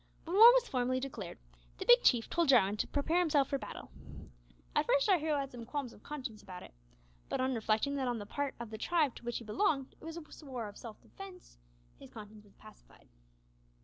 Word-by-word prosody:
When 340 +3 -3
war 455 +4 +11
was - - +2
formally 255 0 0
declared, 270 0 -6 0.4
the 380 - -5
Big 485 +3 +7
Chief 240 - +3
told 340 -3 0
Jarwin 210 -6 +5
to - - -1
prepare 315 +5 0
himself 295 -6 +2
for 275 - -1
battle. - - -9 0.8
At - - +2
first 280 - +3
our 380 -4 +4
hero 305 -1 0
had 275 -1 -3
some 240 -2 -8
qualms 255 0 -5
of - - -17
conscience 255 -8 -7
about 180 -1 -10
it, - - -14 0.6
but - - -2
on 260 0 +1
reflecting 225 +4 0
that 265 -2 -1
on 240 -1 -1
the 205 - -6
part 285 +5 -3
of 235 -2 -7
the 220 - -7
tribe 310 -2 +1
to - - -13
which 240 0 -3
he - - -8
belonged 275 - 0
it - - -23
was 325 +1 -7
a 310 -1 -11
war 245 -5 -5
of 205 - -11
self 225 -3 -10
defence, 380 - -13 0.4
his - - -12
conscience 215 -1 -12
was 205 - -23
pacified. - - -18
265 Hz, 220 wpm, -33 LUFS, 225-315 Hz, 0.8 s, war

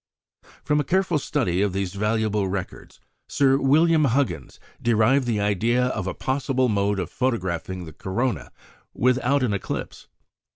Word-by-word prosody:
From 150 0 +1
a - - +1
careful 180 +1 +1
study 110 - -1
of 100 -2 0
these 95 -1 -2
valuable 105 -1 0
records 95 -1 -6 0.3
Sir 135 -1 +3
William 155 +3 +4
Huggins 115 - -1 0.2
derived 120 +3 +3
the 110 -3 0
idea 115 +5 +1
of 110 -6 -3
a - - -3
possible 130 -1 0
mode 100 -1 +1
of 90 -2 -4
photographing 95 -7 -2
the 80 - -10
corona 120 - -3 0.4
without 125 +2 +2
an 115 -5 +1
eclipse. 100 - -5
115 Hz, 140 wpm, -24 LUFS, 100-135 Hz, 0.4 s, William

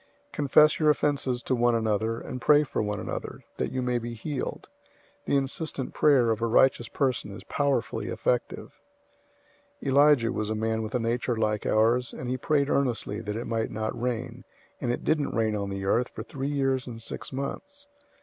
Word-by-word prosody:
005:016 - - -40
Confess 150 +2 +4
your 155 -1 +4
offenses 140 -4 +1
to - - -1
one 120 -1 +3
another, 110 0 0
and 125 - -7
pray 150 0 +5
for 140 - -2
one 105 -1 -2
another, - - -6
that - - -2
you 130 -1 -2
may 125 -1 0
be 120 0 -6
healed. 135 +4 -4 0.6
The 140 - +2
insistent 135 0 -3
prayer 130 -6 +4
of 110 0 -1
a 115 - +1
righteous 120 0 +3
person 130 -5 -1
is 100 - -9
powerfully 140 -6 -1
effective. 125 -1 -2 1.0
005:017 - - -4
Elijah 140 -4 +5
was 110 0 -2
a 110 - -1
man 110 +1 -1
with 110 +2 -4
a - - +2
nature 120 +1 0
like 110 -1 0
ours, 115 +3 +2
and 125 0 -5
he - - 0
prayed 140 +2 +1
earnestly 125 -7 0
that 105 -1 -4
it 115 - -4
might 115 -1 -1
not 110 0 -3
rain, 120 -2 -3 0.4
and 120 - 0
it 120 - -3
didn't 150 -2 0
rain 110 -1 +1
on 100 -1 -2
the 100 0 -4
earth 120 +5 +2
for - - -7
three 135 +1 -4
years 135 -2 0
and 115 -2 -7
six 115 - -7
months. 285 - -6
120 Hz, 195 wpm, -27 LUFS, 110-140 Hz, 1.0 s, pray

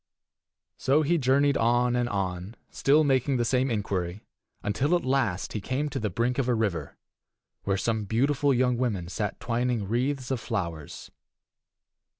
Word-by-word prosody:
So 145 +4 +3
he 170 +3 +2
journeyed 140 +1 +3
on 120 +1 +2
and 120 -1 0
on, 95 +1 -3 0.2
still 150 +3 +3
making 135 -1 +2
the 120 - +1
same 130 +2 +1
inquiry, 100 -4 -2 0.4
until 140 +11 +1
at 175 - -1
last 125 -8 0
he 105 - -3
came 135 +7 -2
to - - -3
the 110 - -1
brink 120 +4 0
of 130 - 0
a 125 - +2
river, 105 -6 -2 0.7
where 95 -1 +1
some 110 +1 -1
beautiful 140 +6 +2
young 125 -1 +2
women 105 -9 -1
sat 105 +2 -3
twining 120 -3 -1
wreaths 130 +4 -1
of 130 - 0
flowers. 85 -9 -5
120 Hz, 155 wpm, -27 LUFS, 105-135 Hz, 0.7 s, So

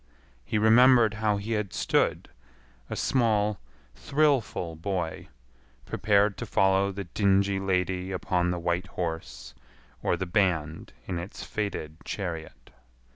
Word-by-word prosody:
He 105 - -2
remembered 115 +1 +6
how 105 -2 +2
he 100 +3 -5
had 105 -3 -1
stood, - - 0 0.6
a - - -3
small, 105 -5 +1 0.3
thrillful 135 - 0
boy, 85 0 -3 0.6
prepared 100 -1 +2
to - - -5
follow 95 0 +2
the 100 +1 -5
dingy 100 +1 +1
lady 95 -1 -1
upon 90 -1 0
the 90 - -1
white 85 +2 -1
horse, 80 -9 -5 0.5
or - - 0
the 95 - -3
band 85 -5 0
in 90 -3 -3
its 90 +5 -7
faded 90 -7 -4
chariot. 85 -5 -6
95 Hz, 125 wpm, -27 LUFS, 90-105 Hz, 0.6 s, remembered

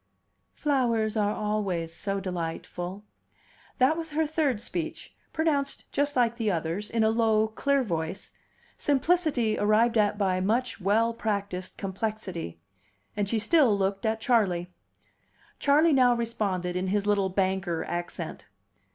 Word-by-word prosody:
"Flowers 235 -7 +1
are 210 -1 +1
always 195 -6 -2
so 195 +2 -2
delightful." 180 +1 -5 0.7
That 265 +4 +4
was 325 -1 -5
her 315 +1 0
third 300 -6 0
speech, 175 -6 -5 0.2
pronounced 290 -4 0
just 285 +1 0
like 235 -2 +2
the 225 -3 0
others, 170 +3 -2
in 230 -1 +1
a 220 - +4
low, 220 -1 +3
clear 275 +5 +1
voice 170 -2 -4 0.5
simplicity 285 -6 +1
arrived 220 +2 +3
at 205 -1 +2
by 190 -3 +1
much 230 +4 0
well 220 +5 +2
practiced 200 -5 -3
complexity. 190 - -4 0.6
And 205 -1 -1
she 230 - +1
still 245 -2 +4
looked 195 0 -1
at 220 0 0
Charley. 190 -7 +1 0.9
Charley 300 +3 +4
now 250 -2 +5
responded 205 -7 -2
in 185 +1 -1
his 200 +1 0
little 200 -2 +2
banker 190 -3 0
accent. 175 0 -5
215 Hz, 135 wpm, -27 LUFS, 190-245 Hz, 0.9 s, now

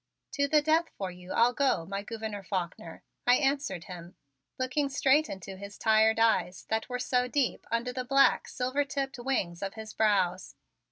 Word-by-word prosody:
"To 280 -1 0
the 300 +1 +3
death 320 +2 +2
for 190 -2 -3
you 180 +1 -11
I'll 235 +2 +3
go, 265 - +1
my 195 +2 -4
Gouverneur 220 -1 -6
Faulkner," 175 -3 -5 0.2
I 245 - +7
answered 275 - 0
him, 175 -1 -10 0.4
looking 260 +3 0
straight 280 +2 +3
into 190 0 -7
his 200 +1 -9
tired 220 0 +4
eyes 185 -6 +1
that 220 +2 -1
were 250 - -2
so 250 0 0
deep 260 -1 -1
under 235 +2 -1
the 255 0 -3
black, 275 +2 +3
silver 255 +3 -1
tipped 275 -2 -4
wings 200 -10 -2
of 195 -1 -4
his 220 -1 -8
brows. 190 -4 +1
230 Hz, 175 wpm, -29 LUFS, 195-270 Hz, 0.4 s, I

